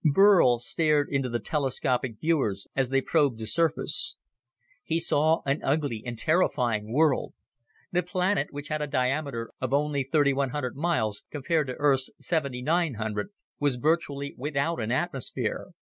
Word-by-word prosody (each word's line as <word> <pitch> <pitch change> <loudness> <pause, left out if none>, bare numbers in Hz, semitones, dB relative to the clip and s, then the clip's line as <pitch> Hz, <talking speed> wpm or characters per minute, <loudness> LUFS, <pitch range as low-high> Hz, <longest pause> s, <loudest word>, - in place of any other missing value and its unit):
Burl 165 -5 +6
stared 150 +4 +1
into 135 -2 0
the 120 - -1
telescopic 130 -3 -1
viewers 135 -12 0
as 135 -2 +1
they 135 0 +2
probed 145 -5 +2
the 110 - -6
surface. 170 - +1 0.7
He 165 +1 0
saw 160 0 +2
an 140 +2 0
ugly 140 -6 0
and 120 -2 -5
terrifying 120 - +1
world. 145 +1 +2 0.6
The 180 - +2
planet, 180 -2 0
which 145 0 -8
had 155 0 -2
a 150 - -1
diameter 130 -3 -1
of 130 +1 0
only 145 -1 +1
3,100 140 -2 0
miles, 135 -10 -1
compared 155 +1 0
to 125 - -4
Earth's 135 -3 +2
7,900, 135 -7 -1 0.3
was 145 -3 +1
virtually 140 0 -1
without 145 +1 -1
an 110 +1 -2
atmosphere. 135 -1 -2
140 Hz, 140 wpm, -27 LUFS, 125-160 Hz, 0.7 s, Burl